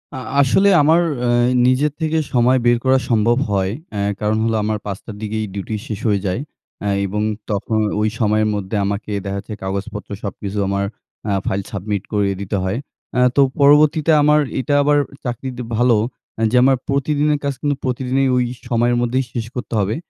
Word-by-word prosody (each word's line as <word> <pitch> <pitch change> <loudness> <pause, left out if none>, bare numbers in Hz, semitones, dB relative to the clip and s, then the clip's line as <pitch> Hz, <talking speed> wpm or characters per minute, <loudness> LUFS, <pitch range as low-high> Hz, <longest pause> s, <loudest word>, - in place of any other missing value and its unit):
আ - - -4 0.2
আসলে 195 +9 +4
আমার 160 +4 +4 0.2
অ্যা 125 - -1 0.4
নিজের 140 +4 +2
থেকে 160 0 0 0.2
সময় 125 +1 +4
বের 120 0 +4
করা 130 0 +5
সম্ভব 115 +1 +3
হয়। 95 -1 +1 0.2
অ্যা 100 - -2 0.2
কারণ 105 0 0
হলো 115 0 +1
আমার 105 0 0
৫ 100 -2 -3
টার 110 - -8
দিকেই 110 0 -2
ডিউটি 100 +2 -4
শেষ 105 -2 -4
হয়ে 100 -1 +2
যায় 95 +6 -1 0.4
অ্যা 100 - -1 0.2
এবং 105 +2 -2 0.3
তখন 105 +2 -1 0.2
ওই 110 - +2
সময়ের 110 -1 +2
মধ্যে 100 +1 -4
আমাকে 100 +2 -3
দেখা 100 0 -3
যচ্ছে 105 +2 -8
কাগজপত্র 100 +2 -4
সবকিছু 100 0 -5
আমার 100 0 0 0.4
আ - - +1 0.2
ফাইল 100 +1 0
সাবমিট 100 0 -3
করিয়ে 100 -2 +1
দিতে 100 +1 -2
হয়। 95 +4 -1 0.4
অ্যা 125 - +2
তো 140 - +5 0.2
পরবর্তীতে 150 +2 +5
আমার 150 +1 +5 0.2
এটা 145 +3 -1
আবার 145 +1 +3 0.3
চাকরিতে 125 +1 -4 0.2
ভালো 120 0 +4 0.4
অ্যা 115 - -1
যে 125 - +1
আমার 135 0 +4
প্রতিদিনের 145 +2 +1
কাজ 140 - 0
কিন্তু 145 -1 0
প্রতিদিনই 130 +1 0
ওই 125 - +3 0.3
সময়ের 120 0 +2
মধ্যেই 125 +2 0
শেষ 115 -2 -3
করতে 125 - -5
হবে। 100 +2 0
115 Hz, 180 wpm, -19 LUFS, 105-130 Hz, 0.4 s, করা